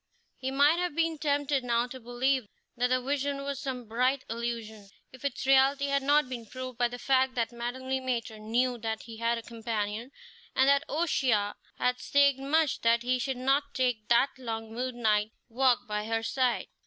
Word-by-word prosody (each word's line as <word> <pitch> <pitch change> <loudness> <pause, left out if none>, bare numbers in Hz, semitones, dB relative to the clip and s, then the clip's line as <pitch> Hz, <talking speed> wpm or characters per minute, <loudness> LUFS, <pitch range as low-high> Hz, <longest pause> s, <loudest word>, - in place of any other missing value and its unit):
He 260 - -2
might 285 +5 +4
have 355 -4 -2
been 330 -1 0
tempted 285 -2 +1
now 235 -1 +1
to 260 +1 -9
believe 245 0 0 0.3
that 245 +1 +1
the 255 0 +2
vision 280 +1 -2
was 280 -1 -3
some 250 -3 -5
bright 255 +4 +1
illusion, 225 -3 -5 0.2
if 260 - -14
its 280 -2 -2
reality 270 +1 +4
had 280 0 +2
not 290 +1 +3
been 240 -3 -7
proved 255 0 -7
by 245 - +4
the 245 +1 -7
fact 260 0 +2
that 230 -1 0
Madame 240 +2 -5
Le 265 0 -1
Maître 235 -4 -3
knew 240 +3 0
that 220 0 -3
he 225 -1 -10
had 230 +1 +1
a 230 - -6
companion, 225 0 -3 0.5
and 265 - +4
that 280 +1 +4
O'Shea 260 -10 +1 0.3
had 250 0 +1
staked 280 -1 +3
much 295 +2 +1
that 230 0 +3
he 255 +1 +1
should 265 +1 -2
not 275 +3 +1
take 245 -5 0
that 240 +4 +4
long 225 -2 -5
moonlight 225 -3 0 0.2
walk 250 +1 +2
by 210 0 -2
her 225 0 -1
side. 255 0 0
250 Hz, 190 wpm, -29 LUFS, 230-270 Hz, 0.5 s, might